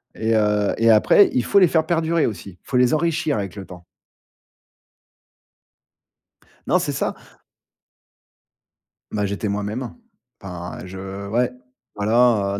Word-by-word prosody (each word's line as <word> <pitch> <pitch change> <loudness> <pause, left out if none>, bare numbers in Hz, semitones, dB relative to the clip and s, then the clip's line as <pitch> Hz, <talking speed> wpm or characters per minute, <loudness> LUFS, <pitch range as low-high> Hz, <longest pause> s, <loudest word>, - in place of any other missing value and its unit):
et 115 0 0
heu 105 -1 +1
et 115 0 +3
après, 110 - +5
il 125 - +1
faut 200 - +3
les 185 - +6
faire 160 -1 +1
perdurer 165 -1 +1
aussi. 100 -4 -6
Faut 130 - -2
les 125 +3 +3
enrichir 160 -3 0
avec 100 -1 -5
le 95 -2 -8
temps. 90 -2 -13 2.8
Non, - - +3
c'est - - -2
ça. - - -2 2.0
Bah, 105 -1 -1
j'étais 100 +2 -3
moi-même. 105 +5 -3 0.5
Enfin, 90 -2 -7
je 95 +2 -7
ouais, 120 +3 +1 0.4
voilà, 105 -1 +2
heu, - - -5
110 Hz, 130 wpm, -21 LUFS, 100-125 Hz, 2.8 s, les